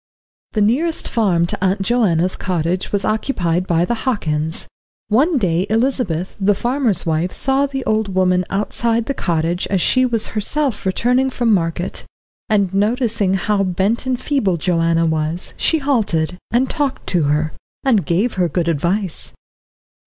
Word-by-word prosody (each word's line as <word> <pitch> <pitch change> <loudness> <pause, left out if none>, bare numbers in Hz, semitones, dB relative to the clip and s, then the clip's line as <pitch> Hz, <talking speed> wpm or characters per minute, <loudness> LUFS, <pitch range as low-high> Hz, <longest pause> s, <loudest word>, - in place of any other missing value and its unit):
The 215 - +1
nearest 290 +11 +1
farm 185 -7 +1
to 175 - -3
Aunt 195 +1 +1
Joanna's 190 -6 +1
cottage 180 0 -2
was 200 -2 0
occupied 185 -6 0
by 170 0 +2
the 240 - -1
Hockins. 160 - -1 0.4
One 285 +9 +3
day 185 -4 +1
Elizabeth, 220 - 0
the 200 +1 +3
farmer's 240 - 0
wife, 165 +2 0
saw 270 +1 +1
the 270 -2 -5
old 215 -3 0
woman 185 -1 +3
outside 225 +3 0
the 275 - -2
cottage 170 -4 -1
as 195 - 0
she 255 +8 +3
was 230 -3 -1
herself 230 +1 -1
returning 250 +7 +2
from 240 -3 +1
market; 175 0 -1 0.5
and, 200 -3 +1
noticing 215 -1 +1
how 200 +2 0
bent 195 +7 0
and 255 -1 0
feeble 255 - 0
Joanna 165 0 +1
was, 160 +2 -1
she 325 - +1
halted, 210 - 0
and 250 +3 +2
talked 285 -1 -2
to 170 -5 +2
her, 150 +1 0 0.3
and 230 -8 +3
gave 195 +8 0
her 175 - +2
good 170 +2 -1
advice. 170 +4 0
195 Hz, 150 wpm, -19 LUFS, 175-240 Hz, 0.5 s, One